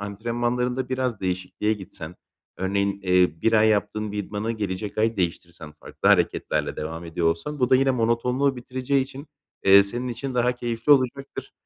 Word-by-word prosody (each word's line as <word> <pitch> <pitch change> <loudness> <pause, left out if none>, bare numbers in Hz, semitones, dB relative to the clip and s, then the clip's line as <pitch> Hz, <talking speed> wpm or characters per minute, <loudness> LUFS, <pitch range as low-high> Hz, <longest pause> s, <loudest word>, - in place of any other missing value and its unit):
antrenmanlarında 120 +5 -2
biraz 130 -4 -2
değişikliğe 95 +3 -1
gitsen, 90 -5 -7 0.4
örneğin, 100 +1 -1
eee, 90 -4 +2
1 115 - +3
ay 110 0 +5
yaptığın 105 0 0
bir 105 - -4
idmanı 105 +2 -3
gelecek 105 -1 -4
ay 110 +1 +1
değiştirsen, 85 -3 -4
farklı 75 - -3
hareketlerle - - +1
devam 80 +2 -5
ediyor 85 0 -2
olsan, 85 - -1
bu 125 - +2
da 130 - +7
yine 135 +1 +3
monotonluğu 125 +3 +1
bitireceği 130 +2 -1
için, 135 +2 -9 0.4
eee, 100 +1 +8
senin 120 +5 -4
için 125 +2 -5
daha 125 0 +2
keyifli 120 +2 +1
olacaktır. 135 +1 -1
110 Hz, 160 wpm, -24 LUFS, 95-125 Hz, 0.4 s, eee